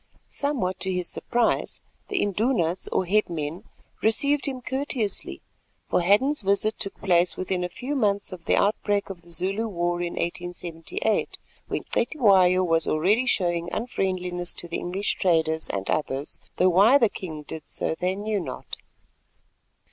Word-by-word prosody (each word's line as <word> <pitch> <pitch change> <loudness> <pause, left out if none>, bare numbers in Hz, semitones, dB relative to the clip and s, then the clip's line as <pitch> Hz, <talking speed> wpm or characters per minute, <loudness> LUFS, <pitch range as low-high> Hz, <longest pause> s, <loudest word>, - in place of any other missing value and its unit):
Somewhat 245 -11 -1
to 190 - -1
his 180 -1 -2
surprise, 240 -1 0 0.3
the 405 - 0
Indunas 200 -4 0
or 185 - +1
headmen, 170 -4 -1 0.4
received 280 +7 +2
him 265 -2 -3
courteously—for 240 - -3
Hadden's 230 +11 +3
visit 200 +2 +1
took 195 - -4
place 175 -2 +2
within 185 -1 -1
a 180 - -2
few 255 +10 -4
months 205 -6 +1
of 180 -2 -9
the - - +3
outbreak 205 -1 +1
of 180 -3 -9
the 170 - -18
Zulu 195 +7 -1
war 175 -3 -1
in 175 0 -2
1878, 175 +3 -2 0.3
when - - -3
Cetywayo 195 - +4
was 165 -2 +2
already 205 +11 +2
showing 175 -6 +1
unfriendliness 180 -6 -2
to 175 - -8
the 170 - -3
English 190 +3 -2
traders 160 -3 +1
and 95 -1 -3
others, 145 -1 -2 0.2
though 185 - +5
why 200 +10 +6
the 235 - +4
king 160 -7 -7
did 155 +1 -9
so - - -1
they 180 +3 -1
knew 210 +1 -1
not. 175 - -6
185 Hz, 150 wpm, -25 LUFS, 175-215 Hz, 0.4 s, why